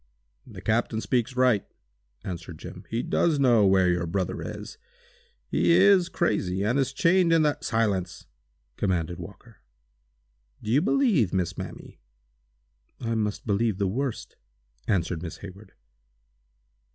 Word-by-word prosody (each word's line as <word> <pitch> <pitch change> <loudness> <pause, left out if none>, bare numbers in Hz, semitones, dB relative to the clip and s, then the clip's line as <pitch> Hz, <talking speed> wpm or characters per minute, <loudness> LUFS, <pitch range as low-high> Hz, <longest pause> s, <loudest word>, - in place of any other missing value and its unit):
"The - - -10
captain 110 0 0
speaks 125 +2 -1
right," 125 -5 +3 0.6
answered 85 -2 -7
Jim. - - -10
"He 115 +2 -2
does 165 -3 +1
know 120 -7 +4
where 95 -1 +4
your 90 -1 0
brother 90 +1 -2
is. - - -8 0.7
He 170 - +2
is 185 0 +5
crazy 95 - 0
and 120 +7 +1
is 135 -1 0
chained 170 +4 +3
in 165 -1 +4
the—" 150 -1 +1
"Silence!" 95 -7 -1 0.5
commanded 90 -2 -1
Walker. 100 +5 -12 1.1
"Do 110 - -3
you 140 +5 +4
believe, 205 - +2
Miss 90 -3 -1
Mamie?" - - -9 1.0
"I 115 -1 -2
must 105 -2 -2
believe 105 0 0
the 100 - 0
worst," 125 +5 -3 0.5
answered 90 -5 0
Miss 85 -3 -7
Hayward. 100 +2 -12
110 Hz, 130 wpm, -26 LUFS, 95-135 Hz, 1.1 s, is